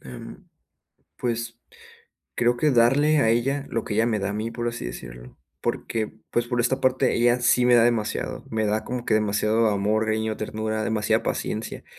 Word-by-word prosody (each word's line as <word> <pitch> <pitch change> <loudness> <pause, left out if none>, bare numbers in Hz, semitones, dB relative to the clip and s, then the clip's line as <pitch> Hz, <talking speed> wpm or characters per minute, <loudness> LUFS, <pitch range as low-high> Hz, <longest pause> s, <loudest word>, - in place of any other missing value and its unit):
Em, 60 -2 -11 0.7
pues, 115 -1 -3 0.8
creo 120 0 +2
que 150 +4 +2
darle 135 +5 +4
a 125 -6 +3
ella 135 +5 0
lo 115 - -2
que 105 - -4
ella 110 +2 +2
me 110 -2 0
da 100 0 -2
a - - -3
mí, 110 +2 -3
por 120 0 -3
así 120 0 -5
decirlo. - - -9 0.2
Porque, 110 -2 -2 0.2
pues, 120 0 0
por 120 0 -1
esta 130 +3 0
parte, 130 0 +2
ella 120 +1 +3
sí 120 +1 +3
me 125 - +5
da 115 -1 +6
demasiado, 115 -3 -1
me 110 -1 0
da 110 +1 0
como 125 -1 -4
que 110 - +1
demasiado 110 +1 +2
amor, 105 +2 +1
cariño, 110 0 -1
ternura, 110 0 -3
demasiada 110 0 +1
paciencia, 110 +1 -4
115 Hz, 185 wpm, -24 LUFS, 110-120 Hz, 0.8 s, da